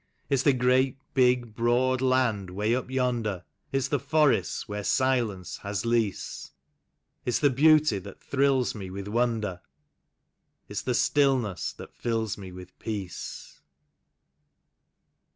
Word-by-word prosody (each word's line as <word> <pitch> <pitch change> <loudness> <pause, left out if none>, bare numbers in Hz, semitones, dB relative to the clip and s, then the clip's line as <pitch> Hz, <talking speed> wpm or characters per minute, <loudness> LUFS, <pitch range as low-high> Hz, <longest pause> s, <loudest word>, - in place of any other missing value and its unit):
It's 135 -2 +3
the 140 - +4
great, 130 +1 +2 0.2
big, 125 -3 +3
broad 125 +3 +2
land 125 -7 +1
'way 105 +5 0
up 125 0 -2
yonder, 120 -8 -1 0.3
It's 135 -2 0
the 145 - +1
forests 150 +2 +1
where 105 -1 -4
silence 120 -8 0
has 100 +2 -4
lease; 115 -4 -1 0.7
It's 125 - +1
the 145 -2 +3
beauty 150 -4 +4
that 95 +1 -11
thrills 135 -2 +1
me 95 -4 -7
with 100 +1 -6
wonder. 110 -5 -1 1.1
It's - - -4
the - - -1
stillness 130 - +2
that - - -11
fills 115 -3 -2
me 95 -2 -9
with 90 0 -12
peace. 100 -5 -6
120 Hz, 125 wpm, -27 LUFS, 105-130 Hz, 1.1 s, the